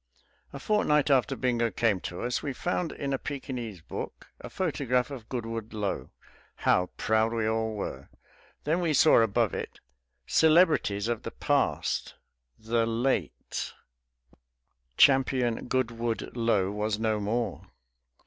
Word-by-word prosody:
A - - -7
fortnight 150 -5 +2
after 130 -5 +3
Bingo 120 -2 +1
came 105 -1 +1
to 90 0 -6
us 120 0 -1
we 140 - -3
found 175 +4 -2
in 140 -1 -3
a 135 - -1
Pekinese 125 - -5
book - - -7
a - - -8
photograph 130 -7 0
of 120 -5 -8
Goodwood 115 -3 -4
Lo. 105 -2 -3 0.5
How 90 0 +2
proud 110 +1 +2
we 115 -2 0
all 110 0 -1
were! 70 -9 -5 0.5
Then 165 +4 +1
we 165 -3 +1
saw 150 -3 +6
above 115 -2 +1
it, - - -5 0.5
"Celebrities 155 - +3
of 120 -2 -1
the - - -5
Past. - - 0 0.4
The 115 +1 0
Late 115 - -2 0.6
" - - -37
Champion 130 -4 +3
Goodwood 120 -3 -2
Lo 110 -5 +1
was 105 0 -1
no 110 -1 0
more! 105 0 -2
115 Hz, 135 wpm, -28 LUFS, 105-135 Hz, 0.6 s, saw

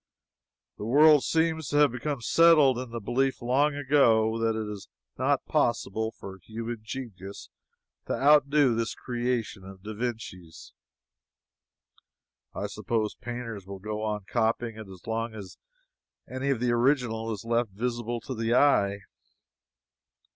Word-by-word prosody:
The - - -5
world 150 +4 +6
seems 160 -2 0
to 145 - 0
have 150 -3 +5
become 130 +2 -4
settled 150 -2 +5
in 130 -1 -6
the 115 0 -5
belief, 130 +5 0
long 140 +4 +1
ago, 115 -6 +3
that 115 -1 0
it 110 - -4
is 105 -2 -7 0.3
not - - +1
possible 110 +3 0
for 95 -3 -10
human 115 +4 -6
genius 110 -5 -8 0.6
to - - -1
outdo 145 -2 +4
this 115 0 -2
creation 120 -5 -3
of 95 0 -12
da 110 +1 -6
Vinci's. 105 -7 -6 1.8
I - - -3
suppose 110 -2 -2
painters 115 -5 -7
will 100 0 -7
go 105 +2 -5
on 105 -2 -3
copying 115 0 0
it 110 -2 -9
as 95 -2 -13
long 115 0 -3
as 100 -4 -10 0.7
any 130 +2 -3
of 135 -4 +1
the 120 0 +1
original 120 -3 +1
is 105 -1 -6
left 115 0 +1
visible 120 +3 -3
to 130 - -6
the 115 0 0
eye. 100 -8 +3
115 Hz, 140 wpm, -27 LUFS, 110-130 Hz, 1.8 s, world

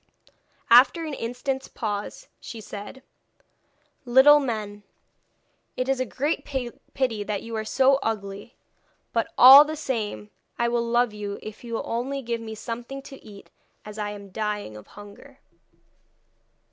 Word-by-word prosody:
After 270 +8 +6
an 305 - -5
instant's 265 +2 -4
pause 210 - -5
she 230 - -9
said: 210 +5 -9 1.0
'Little 265 +4 +7
men, 215 -6 -4 1.0
it 255 - -1
is 270 -1 0
a 255 - -1
great 290 +8 -2
pity 250 -3 -3
that 205 -1 -4
you 230 0 -6
are 220 - -2
so 265 +4 +3
ugly. 205 0 -5 0.6
But, 230 -1 -1
all 270 +3 +11
the 310 +1 -5
same, 225 -8 -4 0.3
I 235 0 +1
will 235 0 0
love 235 -1 +1
you 205 -1 -5
if 215 +2 -9
you 230 -1 -5
will - - -3
only 265 +4 -3
give 235 -1 -3
me 220 -1 -7
something 240 +5 -7
to 270 - -12
eat, 205 -2 -14 0.3
as 210 0 -9
I 210 -1 -2
am 200 -1 -10
dying 210 - -4
of 105 - -12
hunger.' 205 +7 -14
235 Hz, 145 wpm, -25 LUFS, 210-265 Hz, 1.0 s, all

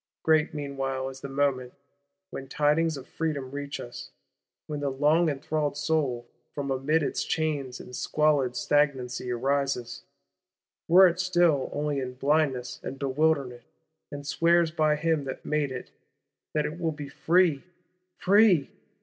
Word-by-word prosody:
Great 155 -1 +3
meanwhile 135 -3 -3
is 135 0 -11
the 140 - -6
moment, 135 -2 0 0.6
when 135 - -7
tidings 150 +3 +1
of 135 - -10
Freedom 145 -5 -3
reach 145 0 -5
us; 120 - -8 0.6
when 150 -1 -5
the 145 -1 -1
long 150 +5 +3
enthralled 145 0 -2
soul, 145 -6 -1 0.3
from 140 -1 -3
amid 145 +4 +1
its - - -1
chains 145 -6 -2
and 125 - -9
squalid 145 -5 +1
stagnancy, 130 -4 0
arises, 135 0 -1 0.9
were 185 +3 +8
it 175 0 -2
still 175 -7 +2
only 145 -1 -1
in 125 -1 -5
blindness 135 -3 0
and 135 - -6
bewilderment, 140 -2 0 0.5
and 145 -1 -7
swears 170 +3 +3
by 155 -2 +2
Him 155 -1 0
that 130 - -7
made 150 -2 0
it, 130 -1 -7 0.6
that 150 -1 +1
it 155 +3 -5
will 165 -2 0
be 150 -2 -7
free! 165 0 +2 0.5
Free? 195 -7 +4
145 Hz, 140 wpm, -27 LUFS, 135-155 Hz, 0.9 s, were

